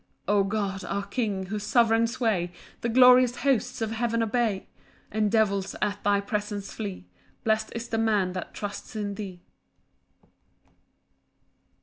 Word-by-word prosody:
5 205 - +2
O 200 - +4
God, 195 -2 -2
our 200 +1 -2
King, 200 -3 -2
whose 210 0 -3
sovereign 230 0 +3
sway 225 -8 0 0.3
The 235 - -1
glorious 250 0 +7
hosts 260 -4 +1
of 220 - -2
heaven 230 0 0
obey, 225 -3 0 0.4
And 215 0 +1
devils 200 -4 +1
at 205 0 -1
thy 205 0 +3
presence 205 -1 -3
flee, 200 - -5 0.4
Blest 220 0 +1
is 230 0 -4
the 225 -1 -1
man 210 -5 +2
that 185 -2 -5
trusts 205 +1 -6
in 205 -2 -2
thee. 190 -4 -7
215 Hz, 140 wpm, -27 LUFS, 200-230 Hz, 0.4 s, glorious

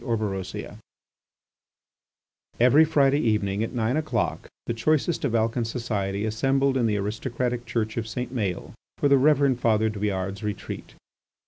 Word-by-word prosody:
ORBEROSIA 105 -6 -3 1.8
Every 130 +6 +6
Friday 145 -2 +3
evening 105 -5 0
at 115 - -4
nine 120 +1 0
o'clock 155 0 -1 0.2
the - - -2
choicest 155 +8 0
of 125 -5 0
Alcan 115 +2 +1
society 110 -4 -2
assembled 135 +5 +1
in 120 -3 +2
the 105 -1 +1
aristocratic 120 +4 -3
church 110 -1 -2
of 115 -1 -2
St. 125 +3 -4
Maël 100 -7 -3 0.2
for - - +2
the 140 -1 +5
Reverend 140 -2 +3
Father 110 -2 +2
Douillard's 100 -2 -3
retreat. 105 -3 -6
115 Hz, 135 wpm, -25 LUFS, 105-130 Hz, 1.8 s, Every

